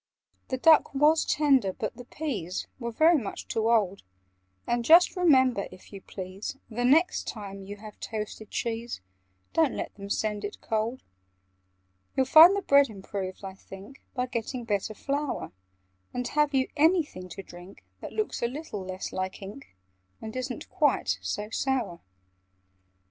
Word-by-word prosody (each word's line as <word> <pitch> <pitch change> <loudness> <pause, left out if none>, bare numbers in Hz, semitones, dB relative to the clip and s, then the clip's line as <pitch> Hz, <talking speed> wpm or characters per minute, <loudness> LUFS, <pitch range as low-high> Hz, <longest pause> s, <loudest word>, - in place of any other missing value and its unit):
"The 260 - -2
duck 315 0 +5
was 300 +3 +4
tender, 270 -10 +3
but 215 - -4
the 245 - -10
peas 215 - -4
Were 235 -2 -3
very 315 +6 +5
much 210 -5 -6
too 225 0 0
old: 200 -4 +2 0.6
And 240 0 0
just 335 +9 +6
remember, 260 - +3
if 185 - -15
you 195 - -8
please, 190 +7 -7
The 240 +3 -2
next 320 +8 +3
time 200 -3 -6
you 200 +1 -8
have 210 0 -12
toasted 215 -1 -6
cheese, 230 0 -3 0.5
Don't 320 -5 +2
let - - -4
them 200 0 -9
send 210 0 -1
it 205 - -5
cold. 225 +3 -2 1.1
"You'd 265 -1 +3
find 330 +6 +9
the 400 - -2
bread 280 -3 +5
improved, 195 -2 -6
I 190 - -6
think, 195 +6 -13
By 250 -1 0
getting 240 0 -4
better 215 -1 -2
flour: 280 - -3 0.6
And 250 0 -2
have 300 -1 +2
you 260 -1 +2
anything 300 - +2
to 195 - -8
drink 175 +2 -13 0.2
That - - -8
looks 430 -1 -2
a 235 - +2
little 255 -6 -6
less 185 0 -6
like 185 0 -3
ink, 205 - -11 0.4
And 220 +1 -8
isn't 255 0 -4
quite - - +1
so 210 +1 -4
sour?" 240 -10 -1
235 Hz, 155 wpm, -28 LUFS, 200-280 Hz, 1.1 s, find